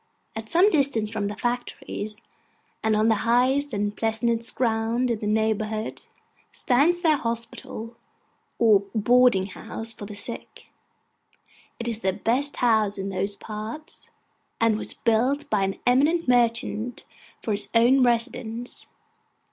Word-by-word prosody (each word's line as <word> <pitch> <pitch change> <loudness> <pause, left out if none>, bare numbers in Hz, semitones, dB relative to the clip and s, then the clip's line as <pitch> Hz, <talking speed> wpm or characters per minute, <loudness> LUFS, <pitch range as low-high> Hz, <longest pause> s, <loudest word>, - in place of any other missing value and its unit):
At 220 0 -6
some 370 +5 +5
distance 265 -8 +2
from 215 -2 -2
the 205 - -5
factories, 240 -3 -4 0.6
and 220 -1 +2
on 215 +1 +3
the 220 -2 +3
highest 260 +5 +2
and 205 -1 -2
pleasantest 230 +1 0
ground 230 +1 0
in 225 - -1
the 210 - -3
neighbourhood, 215 0 -1 0.5
stands 305 +8 +2
their 315 -4 +3
hospital, 230 -1 -4 0.6
or 220 -4 +5 0.2
boarding 240 -2 +4
house 225 +3 -4
for 205 - -9
the 210 - -8
sick: 205 +3 -6 1.1
it 235 - -4
is 230 -2 -1
the 190 -3 0
best 265 +9 0
house 220 -4 +2
in 195 0 -4
those 195 +1 -2
parts, 215 +9 -7 0.5
and 230 -1 +3
was 215 - -5
built 255 +6 +1
by 210 -2 +2
an 195 0 -2
eminent 295 +7 +3
merchant 240 -1 0 0.4
for 220 - -2
his 205 0 0
own 245 +4 +5
residence. 240 0 -1
230 Hz, 135 wpm, -25 LUFS, 215-245 Hz, 1.1 s, some